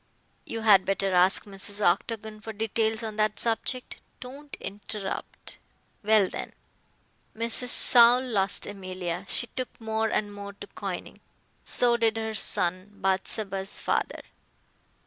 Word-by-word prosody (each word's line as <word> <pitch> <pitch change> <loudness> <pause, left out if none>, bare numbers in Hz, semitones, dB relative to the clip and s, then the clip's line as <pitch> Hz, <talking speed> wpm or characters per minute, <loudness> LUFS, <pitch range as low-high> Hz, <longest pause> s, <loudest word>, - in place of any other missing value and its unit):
You 225 - -5
had 205 -4 +6
better 195 0 -1
ask 180 +1 +3
Mrs. 200 0 -2
Octagon 215 +3 -1
for 220 0 -7
details 220 +1 -1
on 215 -1 -5
that 215 0 0
subject. 240 +2 -1 0.2
Don't 275 +3 -10
interrupt. 205 0 -6 0.4
Well, 215 -2 +4
when - - -7 0.8
Mrs. 230 +2 0
Saul 240 0 +8
lost 200 -6 0
Emilia, 185 -2 -6
she - - +1
took 255 -1 -6
more 220 0 -1
and 205 -1 -2
more 200 0 -8
to 200 - -10
coining. 195 -3 -7 0.5
So 240 -1 +3
did 225 -1 +1
her 220 0 -3
son, 185 -2 +1
Bathsheba's 195 0 -1
father. - - -2
215 Hz, 125 wpm, -26 LUFS, 195-225 Hz, 0.8 s, Saul